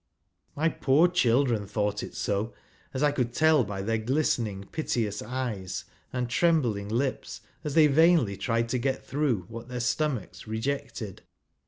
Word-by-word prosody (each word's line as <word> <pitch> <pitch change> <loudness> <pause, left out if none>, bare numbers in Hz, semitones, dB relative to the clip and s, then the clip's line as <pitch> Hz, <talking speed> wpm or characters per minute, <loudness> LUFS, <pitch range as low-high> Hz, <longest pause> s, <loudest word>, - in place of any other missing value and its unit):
My 155 +3 +2
poor 150 +1 +4
children 125 - +2
thought 105 0 -1
it - - -8
so, 105 +3 -1 0.4
as 135 +1 -2
I 145 - +4
could 125 -4 -1
tell 155 -2 +4
by 100 -2 -4
their 115 +2 0
glistening,, 110 -6 0
piteous 115 -10 -1
eyes 120 -8 -4 0.3
and 125 -1 -1
trembling 125 -8 +1
lips, 130 +4 -2 0.2
as 150 - -3
they 160 -2 +7
vainly 150 - +4
tried 115 +4 0
to 125 +1 0
get 130 +2 -1
through 140 -8 0
what 115 +1 -8
their 125 -1 -4
stomachs 125 - -2
rejected. 110 -2 -3
125 Hz, 150 wpm, -28 LUFS, 110-145 Hz, 0.4 s, they